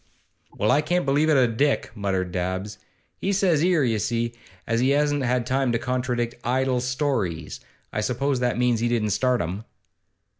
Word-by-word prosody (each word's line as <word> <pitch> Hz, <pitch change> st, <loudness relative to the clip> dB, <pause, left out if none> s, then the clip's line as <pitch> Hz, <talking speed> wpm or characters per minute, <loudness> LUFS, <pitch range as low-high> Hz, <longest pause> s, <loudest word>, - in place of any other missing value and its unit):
'Well, 105 Hz, -, +2 dB
I 145 Hz, -, +4 dB
can't 175 Hz, +3 st, 0 dB
believe 145 Hz, +3 st, +2 dB
it 150 Hz, -, +4 dB
o' 130 Hz, -, +5 dB
Dick,' 130 Hz, +5 st, 0 dB
muttered 95 Hz, -4 st, -2 dB
Dabbs. 95 Hz, +3 st, -3 dB, 0.4 s
'He 195 Hz, -, -1 dB
says 185 Hz, -6 st, +2 dB
'ere, 175 Hz, -4 st, +3 dB
you 115 Hz, -4 st, +1 dB
see, 115 Hz, +3 st, -1 dB, 0.3 s
as 115 Hz, 0 st, 0 dB
he 130 Hz, +2 st, +2 dB
hasn't 140 Hz, -4 st, +1 dB
time 130 Hz, 0 st, +1 dB
to -, -, +2 dB
contradict 125 Hz, -1 st, -2 dB
"idle 130 Hz, 0 st, +1 dB
stories." 125 Hz, -, -2 dB, 0.3 s
I 105 Hz, -, -1 dB
suppose 130 Hz, +4 st, 0 dB
that 125 Hz, -1 st, 0 dB
means 120 Hz, -2 st, +2 dB
he 120 Hz, -, +1 dB
didn't 110 Hz, -3 st, 0 dB
start 125 Hz, +5 st, +1 dB
'em. 90 Hz, +6 st, -4 dB
125 Hz, 175 wpm, -24 LUFS, 110-140 Hz, 0.4 s, o